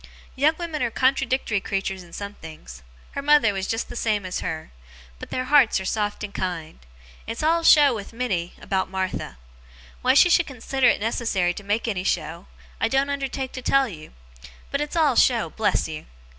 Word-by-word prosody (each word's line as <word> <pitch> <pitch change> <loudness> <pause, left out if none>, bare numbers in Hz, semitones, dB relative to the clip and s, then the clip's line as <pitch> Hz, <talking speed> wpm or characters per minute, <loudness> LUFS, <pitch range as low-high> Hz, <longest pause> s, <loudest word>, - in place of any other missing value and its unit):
Young 295 +4 +3
women 335 -3 -4
are 240 - +1
contradictory 260 -3 +1
creatures 195 -1 -3
in 175 -1 -15
some 200 +3 -6
things 155 - -11 0.3
her 280 - -4
mother 285 -7 +4
was 195 -1 -3
just 225 0 -2
the - - -9
same 215 -4 0
as 185 - -3
her 160 -2 -5 0.5
but - - -9
their 255 - -2
hearts 270 -6 +4
are 190 - -6
soft 205 +1 -2
and 205 -1 -6
kind. 170 -4 -4 0.5
It's 230 +6 -4
all 330 +2 +3
show 295 -4 +6
with 205 -3 -6
Minnie, 205 -8 -2
about 190 -1 -1
Martha. 185 - -3 0.6
Why 260 +1 +3
she 285 - +7
should 345 -1 +3
consider 265 -1 0
it - - +3
necessary 210 -5 0
to 205 - -9
make 210 +4 -1
any 195 -5 -2
show, 165 0 -2 0.3
I - - +2
don't 270 +4 +1
undertake 270 -1 -3
to 255 - -7
tell 275 +1 +3
you. 155 -8 -11 0.6
But 280 - -1
it's 295 +2 -4
all 305 -6 +3
show, 235 -2 +3
bless 220 - 0
you. 155 -1 -8
225 Hz, 190 wpm, -24 LUFS, 190-270 Hz, 0.6 s, she